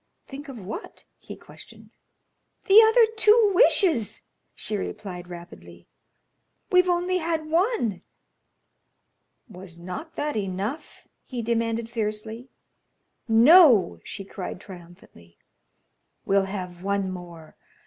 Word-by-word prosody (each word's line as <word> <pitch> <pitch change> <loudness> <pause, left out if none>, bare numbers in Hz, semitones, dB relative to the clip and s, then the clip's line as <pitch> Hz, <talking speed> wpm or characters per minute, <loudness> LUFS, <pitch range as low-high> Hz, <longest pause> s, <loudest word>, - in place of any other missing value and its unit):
"Think 285 +1 -10
of 265 - -9
what?" 220 - -9
he - - -10
questioned. - - -16 0.7
"The 420 +2 +8
other 450 +1 +5
two 435 -1 +5
wishes," 350 - +2 0.3
she 215 - -5
replied, 195 -3 -6
rapidly. 175 0 -12 0.8
"We've 365 0 +4
only 360 +1 0
had 325 -1 -2
one." 335 - 0 1.5
"Was 185 -5 -11
not 185 - -8
that 295 0 -3
enough?" 200 - -5 0.2
he 245 -3 -6
demanded, 230 0 -1
fiercely. 225 +1 -5 0.8
"No," 230 - +6
she 195 - -8
cried, 185 -2 -7
triumphantly; 175 - -15 0.9
"we'll 195 0 +2
have 180 -3 -7
one 195 0 -2
more. 175 -3 -11
220 Hz, 105 wpm, -24 LUFS, -, 1.5 s, The